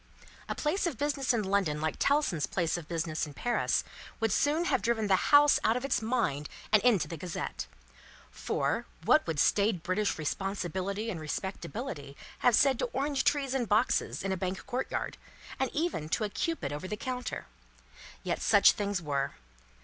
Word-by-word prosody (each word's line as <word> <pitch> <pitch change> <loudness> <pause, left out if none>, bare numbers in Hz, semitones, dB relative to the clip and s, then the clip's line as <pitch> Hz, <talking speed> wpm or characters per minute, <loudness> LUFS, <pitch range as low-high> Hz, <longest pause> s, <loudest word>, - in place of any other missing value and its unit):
A - - -1
place 345 +5 0
of 285 - -3
business 285 -1 0
in 230 -3 +1
London 190 -6 +1
like 155 0 -2
Tellson's 280 - +2
place 170 -4 0
of 170 -3 -6
business 165 -2 -2
in 145 - -11
Paris, 240 0 +1 0.4
would 225 -1 +1
soon 300 - +2
have - - +1
driven 225 -2 +1
the 190 -2 +2
House 290 0 +7
out 225 +2 +3
of 250 - -3
its 275 - +1
mind 220 - -1 0.2
and 215 -1 +6
into 215 -6 +3
the 165 - -6
Gazette. 175 +2 -5 0.6
For, - - -1 0.2
what - - +4
would 160 -3 -1
staid 200 +1 +2
British 195 +3 0
responsibility 195 +5 -2
and 170 - -5
respectability 170 - -5 0.2
have 245 - +4
said 265 -1 +4
to - - +1
orange 275 0 0
trees 275 -3 +1
in 260 -3 0
boxes 215 -1 +1
in 195 - -1
a 190 - 0
Bank 185 0 -3
courtyard, 260 0 -3 0.4
and 265 - +1
even 295 - -2
to 215 - 0
a 210 - -1
Cupid 315 - -2
over 150 +5 -5
the 210 - -4
counter? 250 0 -4 0.8
Yet - - -2
such - - +6
things 200 -4 -2
were. 140 -2 -1
205 Hz, 175 wpm, -30 LUFS, 170-255 Hz, 0.8 s, House